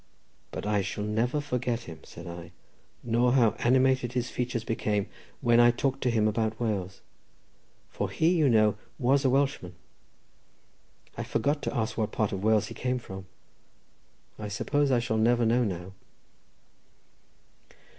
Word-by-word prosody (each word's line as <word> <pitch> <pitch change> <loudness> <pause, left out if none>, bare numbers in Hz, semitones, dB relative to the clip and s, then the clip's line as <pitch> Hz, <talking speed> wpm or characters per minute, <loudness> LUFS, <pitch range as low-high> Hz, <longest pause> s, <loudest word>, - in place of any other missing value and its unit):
"But - - -6
I 105 -1 +1
shall 100 +2 -4
never 115 +7 0
forget 125 -4 -2
him," 80 -8 -10
said 85 - -11
I, 85 0 -9 0.5
"nor 120 +1 +2
how 120 -5 +5
animated 130 0 +2
his 125 -1 -2
features 125 -2 -2
became 105 -3 -1 0.4
when 120 0 +4
I 120 0 +7
talked 135 +3 -1
to 125 - +1
him 110 -2 +2
about 110 0 -1
Wales, 100 -5 -2 0.9
for - - -2
he, 160 - +2
you 155 -6 +3
know, 110 -2 +3 0.2
was 135 +1 +2
a 130 - +3
Welshman. 135 -9 0 1.4
I - - -1
forgot, 145 +1 0
to - - -3
ask 110 0 -2
what 110 -1 0
part 110 -2 0
of 95 0 -4
Wales 110 -1 +3
he - - -8
came 125 0 -1
from. 95 -5 -9 1.1
I 105 - -4
suppose 140 +8 0
I 130 - +3
shall 115 -2 -1
never 120 +2 +3
know 120 +2 +3
now." 95 -3 -4
115 Hz, 155 wpm, -28 LUFS, 105-125 Hz, 1.4 s, I